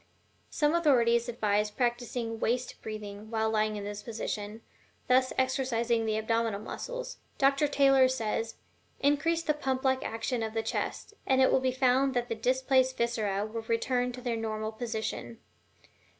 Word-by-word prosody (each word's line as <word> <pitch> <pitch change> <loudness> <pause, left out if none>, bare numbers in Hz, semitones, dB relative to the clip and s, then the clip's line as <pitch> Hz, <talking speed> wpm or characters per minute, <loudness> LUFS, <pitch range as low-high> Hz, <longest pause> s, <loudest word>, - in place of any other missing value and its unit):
Some 300 0 +1
authorities 240 -8 +3
advise 210 -2 +1
practicing 240 0 -2
waist 245 +3 -1
breathing 215 -1 -7
while 220 -1 0
lying 215 -1 +1
in 205 - -5
this 205 0 -5
position, 215 -1 -5 0.4
thus 255 +1 +4
exercising 245 -3 +1
the 215 0 +1
abdominal 225 -1 0
muscles. - - -6 0.2
Dr. 275 +2 +3
Taylor 270 -2 +5
says: 225 -3 -2 0.4
"Increase 320 +4 +2
the 300 - +2
pump 265 -3 -2
like 260 0 +2
action 225 +2 -2
of 220 0 -3
the 225 - 0
chest, 225 - -3
and 265 0 +3
it 260 - +5
will - - +4
be 260 0 +1
found 260 +1 +2
that 245 0 0
the 230 - -1
displaced 260 +2 +2
viscera 215 -4 0
will 225 +1 -5
return 245 +2 0
to 250 - -8
their 240 -2 -1
normal 220 -1 -3
position." 225 0 -4
235 Hz, 155 wpm, -29 LUFS, 220-260 Hz, 0.4 s, Taylor